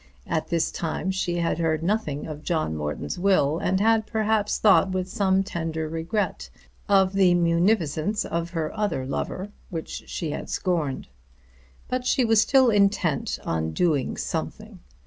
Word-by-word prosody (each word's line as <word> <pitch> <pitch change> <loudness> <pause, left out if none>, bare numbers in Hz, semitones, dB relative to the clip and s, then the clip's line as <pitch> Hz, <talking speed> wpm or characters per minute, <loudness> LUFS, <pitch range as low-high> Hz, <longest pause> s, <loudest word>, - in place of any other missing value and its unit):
At 160 - -2
this 170 -2 0
time 175 +3 -2
she 185 -2 -1
had 170 -1 0
heard 160 -1 0
nothing 170 -7 -1
of 150 -1 -7
John 155 - -1
Morton's 75 - -4
will, 175 -5 +2
and 190 +1 0
had 220 +1 +3
perhaps 215 -1 0
thought 200 -2 +5
with 185 -1 -1
some 190 0 +1
tender 160 -4 -3
regret 165 +7 -2 0.4
of 195 -1 +4
the 190 -2 +4
munificence 175 +2 +1
of 170 0 -2
her 165 -1 -3
other 205 -11 -1
lover, 185 +8 -4 0.2
which 165 -3 -6
she 160 -3 -4
had - - -5
scorned. 165 -8 -1 0.8
But 255 0 -2
she 255 - +3
was 225 -2 +5
still 260 -2 +4
intent 200 -7 +1
on 80 -1 -1
doing 150 - 0
something. - - -5
175 Hz, 150 wpm, -25 LUFS, 160-205 Hz, 0.8 s, thought